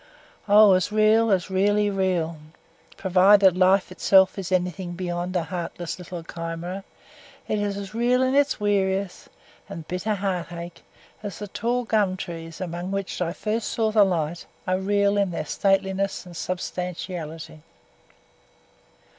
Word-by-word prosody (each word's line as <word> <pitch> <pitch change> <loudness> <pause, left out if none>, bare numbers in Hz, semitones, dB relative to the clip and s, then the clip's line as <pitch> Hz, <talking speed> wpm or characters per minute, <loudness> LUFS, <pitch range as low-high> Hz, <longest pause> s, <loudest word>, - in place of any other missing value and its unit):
Oh! 205 -1 +8
as 185 +2 +1
real, 215 +1 +4
as 190 -2 +1
really 205 +2 +2
real 180 -4 0 0.6
provided 190 0 +5
life 185 +1 +3
itself 190 +1 +4
is 190 -1 -5
anything 180 -1 -1
beyond 175 0 -4
a 175 - +1
heartless 175 0 -5
little 175 -1 -7
chimera 165 +3 -6 0.6
it 215 - 0
is 205 -1 -2
as 200 0 -7
real 245 +3 +2
in 260 0 +1
its 285 -2 +2
weariness 195 -2 -1 0.4
and 165 -2 -8
bitter 185 +4 -2
heartache 175 -3 -4 0.4
as 205 -4 -6
the 205 - -6
tall 240 +5 -1
gum 210 -5 +1
trees, 165 -3 -7
among 175 0 -4
which 195 -1 -3
I 170 -1 0
first 215 +4 -2
saw 220 -1 0
the 215 -1 +6
light, 170 -3 -2 0.2
are 185 0 0
real 200 +1 +2
in 200 -2 +2
their 165 -3 -4
stateliness 195 +2 0
and 175 -1 -12
substantiality. 175 -3 -5
190 Hz, 140 wpm, -24 LUFS, 175-205 Hz, 0.6 s, Oh